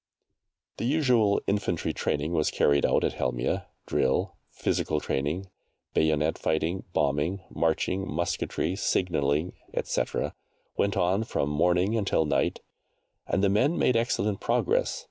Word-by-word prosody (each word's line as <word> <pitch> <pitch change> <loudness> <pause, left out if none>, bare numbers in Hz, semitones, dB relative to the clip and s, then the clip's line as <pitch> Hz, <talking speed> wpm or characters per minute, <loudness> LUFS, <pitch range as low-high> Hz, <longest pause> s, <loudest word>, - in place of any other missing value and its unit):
The - - -3
usual 125 -7 +3
infantry 100 -4 -1
training 75 +3 -1
was 80 -2 +2
carried 70 -1 +3
out - - +2
at - - +1
Helmieh 65 0 -1 0.2
drill, 65 - +1 0.2
physical 75 - -1
training, 75 +7 -2 0.5
bayonet 80 0 +1
fighting, 80 +4 -1
bombing, 75 +6 0
marching, 90 +4 0
musketry, 85 +3 -1
signalling, 80 -4 0 0.2
etc., - - -1 0.4
went 100 -1 0
on 95 +5 +2
from 75 -9 -1
morning 90 +7 +2
until 100 -7 +1
night, 75 - 0 0.7
and 95 - 0
the - - +5
men 130 - +2
made 125 - +3
excellent 105 -4 0
progress. - - +1
90 Hz, 125 wpm, -27 LUFS, 75-100 Hz, 0.7 s, the